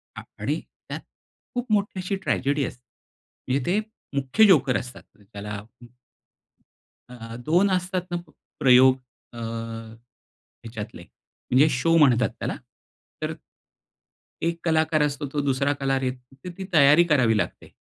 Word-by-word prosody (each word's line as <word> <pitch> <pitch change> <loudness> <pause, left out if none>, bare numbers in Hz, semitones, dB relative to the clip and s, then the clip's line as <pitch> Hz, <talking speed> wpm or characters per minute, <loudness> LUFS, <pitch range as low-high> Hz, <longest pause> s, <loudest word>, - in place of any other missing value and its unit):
आ - - -6 0.2
आणि - - -1 0.3
त्यात - - -4 0.6
खूप 245 -1 -3
मोठी 200 -2 +1
अशी 185 +2 -2
ट्रॅजेडी 140 +2 +1
असते. 125 - -8 0.7
म्हणजे 130 0 0
ते 190 +4 +2 0.4
मुख्य 140 +10 +3
जोकर 145 -9 +4
असतात 125 +1 -10 0.2
त्याला 100 +1 -9
हं, 115 +4 -10 1.2
अ, - - -11 0.2
अ, - - -6
2 180 +5 +3
असतात 185 0 0
ना 175 - 0
प - - -21 0.3
प्रयोग 130 0 +7 0.4
अ, 120 - -10
ह्याच्यातले 115 0 -7 0.9
म्हणजे 135 +5 0
शो 150 +5 +2
म्हणतात 125 -8 +5
त्याला. - - -2 0.7
तर - - -2 1.1
एक 170 0 -1
कलाकार 160 -1 +2
असतो 145 -1 -1
तो 150 - 0
दुसरा 140 +1 +1
कलाकार 135 -1 -1
येतो 125 0 -5
तर 180 - -4
ती 195 - -5
तयारी 150 +1 +7
करावी 125 -8 +3
लागते. 90 -3 -3
135 Hz, 140 wpm, -25 LUFS, 125-165 Hz, 1.2 s, प्रयोग